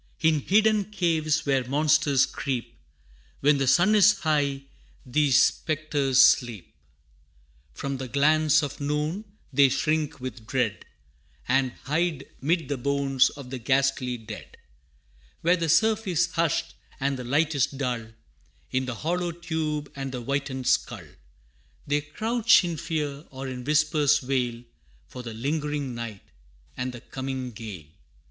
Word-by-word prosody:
In 160 -2 +3
hidden 210 +5 +3
caves 165 -6 0
where 135 -2 +2
monsters 145 +1 +3
creep, 120 -4 -4 0.7
When 145 0 +4
the 135 - 0
sun 175 +10 +4
is 210 -1 +5
high, 145 -3 0 0.4
these 135 +1 +3
spectres 140 -3 +3
sleep: 120 -8 +1 1.0
From 140 -1 -3
the 130 0 -5
glance 155 +3 +3
of 145 0 -5
noon, 150 +8 -2 0.3
they 140 0 +6
shrink 155 +2 -1
with 125 -3 -7
dread, 125 -6 -1 0.6
And 130 -1 +2
hide 155 -1 -1 0.2
'mid 160 +1 0
the 140 - -2
bones 140 0 +2
of 135 -3 -11
the 130 - -4
ghastly 130 0 +1
dead. 110 -2 -10 0.8
Where 175 +2 +4
the 165 -2 -2
surf 220 +5 +3
is 175 -2 +1
hushed, 165 -2 0 0.3
and 140 +1 0
the 125 - -6
light 150 +6 +1
is 140 -3 +2
dull, 125 -5 -3 0.6
In 130 0 0
the 125 - -3
hollow 175 +6 -1
tube 160 -3 -3
and 135 -1 -4
the 125 -1 -5
whitened 135 0 -3
skull, - - 0 0.8
They 145 +1 +1
crouch 220 +10 +3
in 170 -2 -3
fear 150 -2 -3
or 135 0 -7
in 125 -1 -6
whispers 150 -1 +3
wail, 125 -3 -1 0.4
For 125 - -9
the 115 -2 -7
lingering 145 +1 -2
night, 115 -4 -7 0.5
and 125 +1 -3
the 120 -1 -10
coming 130 -1 -5
gale. 105 -8 -8
140 Hz, 140 wpm, -26 LUFS, 130-155 Hz, 1.0 s, they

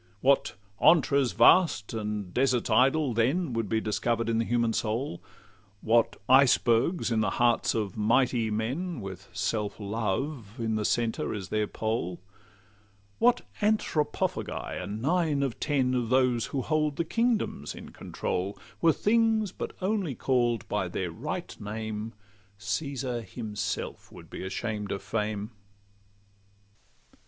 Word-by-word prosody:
What 140 +1 +3 0.3
'antres 140 -6 +4
vast 160 - +4
and 105 -4 -4
deserts 125 -3 +1
idle' 135 +4 +3
then 130 +7 +1
Would 115 -3 -2
be 110 - +2
discover'd 115 +2 -1
in 115 0 +1
the 115 - +1
human 115 -1 +1
soul! 110 -2 -2 0.6
What 115 +1 +2
icebergs 130 +3 +4
in 115 - +2
the 105 - +1
hearts 120 -1 +2
of 105 -4 -2
mighty 115 +1 +2
men, 130 +10 -2
With 95 -1 -8
self 105 0 -2
love 110 +3 -3
in 115 -2 -1
the 110 -1 -1
centre 115 -1 0
as 95 -3 -6
their 105 -1 0
pole! 110 -6 -2 1.0
What 245 +1 +4 0.2
Anthropophagi 210 - -1
are 90 - -5
nine 145 - 0
of 135 -4 -3
ten 135 -4 +1
Of 120 -3 0
those 125 -4 +2
who 135 -3 -2
hold 150 0 0
the 170 - -1
kingdoms 225 - 0
in - - -10
control 95 +3 -4 0.2
Were 165 - +5
things 220 -1 +2
but - - -6
only 190 - 0
call'd 120 -4 +1
by - - -1
their - - -3
right - - -5
name, 110 +1 -5 0.4
Caesar 130 +1 -3
himself 110 0 -5
would - - -13
be - - -6
ashamed 105 +1 -3
of 100 - -4
fame. 105 -1 -2
115 Hz, 135 wpm, -28 LUFS, 105-140 Hz, 1.0 s, Were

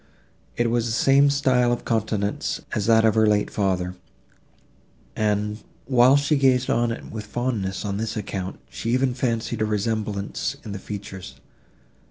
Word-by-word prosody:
It 120 -1 +1
was 120 -1 +1
the - - -2
same 140 +4 +4
style 130 -3 +2
of 120 - -2
countenance 105 -3 -1
as 105 - -1
that 115 -1 +5
of 110 - +4
her 110 -1 +4
late 105 -1 +2
father, 90 -3 0 1.2
and, 105 0 0 0.3
while 130 +2 +5
she 145 +1 +2
gazed 130 -2 +3
on 120 0 +1
it 115 - -7
with 105 -1 -6
fondness 105 -5 -2
on 100 -1 -2
this 110 +1 -3
account, 95 -2 -4
she 115 - -5
even 130 -1 +1
fancied 115 -2 -2
a - - +3
resemblance 105 +3 -2
in 105 - -6
the 100 - -5
features. 100 -2 -8
110 Hz, 160 wpm, -24 LUFS, 105-125 Hz, 1.2 s, that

